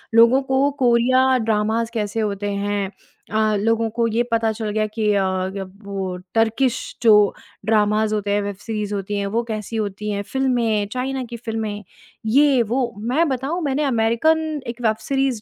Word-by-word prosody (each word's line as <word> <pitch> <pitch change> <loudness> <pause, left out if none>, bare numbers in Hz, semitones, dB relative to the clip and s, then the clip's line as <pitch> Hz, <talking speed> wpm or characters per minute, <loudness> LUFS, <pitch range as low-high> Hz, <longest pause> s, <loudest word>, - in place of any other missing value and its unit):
लोगों 235 +4 +6
को 265 +1 +2
Korea 255 +2 +4
dramas 225 +1 0
कैसे 210 0 -2
होते 205 -1 -2
हैं। 200 -1 -1 0.4
अ, 215 -1 +2
लोगों 225 +1 +1
को 230 -1 +2
ये 230 +2 +1
पता 225 -1 +2
चल 220 0 -4
गया 215 +1 0
कि 215 -2 +1
अ, 200 -1 +2
अब 190 0 -3
वो 195 -2 -3 0.2
टर्किश 230 +3 +2 0.2
जो 225 - +7 0.5
ड्रामाज़ 215 0 +2
होते 205 -1 -2
हैं, 205 0 +2
वेब 200 -1 -4
सीरीज़ 210 0 -4
होती 200 +1 -3
हैं, 200 - -1
वो 230 +4 0
कैसी 220 -1 -5
होती 210 -1 -3
हैं। 200 - -2
फ़िल्में, 235 -5 0
चाइना 260 +1 -2
की 235 -1 -7
फ़िल्में, 220 -3 -4 0.4
ये 270 +2 +4
वो। 235 +1 -1 0.2
मैं 330 +5 +3
बताऊँ 270 +7 -2
मैंने 285 0 0
अमेरिकन 290 +5 +1
एक 235 +1 -6
वेब 220 -2 +2
सीरीज़ 270 -5 +1
225 Hz, 170 wpm, -21 LUFS, 210-250 Hz, 0.5 s, जो